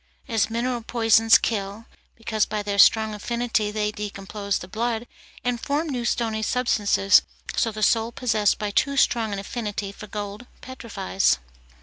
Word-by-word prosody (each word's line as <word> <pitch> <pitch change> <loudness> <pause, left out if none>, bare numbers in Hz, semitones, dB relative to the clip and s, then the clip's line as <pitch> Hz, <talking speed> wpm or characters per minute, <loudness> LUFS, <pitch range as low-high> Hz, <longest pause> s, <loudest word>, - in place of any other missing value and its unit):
As 225 -4 +1
mineral 240 +1 -2
poisons 225 -1 +4
kill, 205 0 -3 0.3
because 220 -2 -1
by 210 -1 -3
their 200 -1 -2
strong 220 +1 +5
affinity 235 0 -1
they 210 0 -1
decompose 200 -1 -4
the 180 - -8
blood 230 +3 -2 0.4
and 245 -1 -1
form 300 +3 -1
new 245 -4 -3
stony 225 -2 -1
substances, 210 -4 +3 0.3
so 225 - +1
the 215 0 -4
soul 225 +2 +2
possessed 220 -4 +1
by 210 -1 -3
too 280 +6 +1
strong 230 -5 +2
an 200 - -3
affinity 205 -1 -4
for 210 +1 -11
gold 210 +3 -6
petrifies. 95 - -1
220 Hz, 150 wpm, -24 LUFS, 205-235 Hz, 0.4 s, strong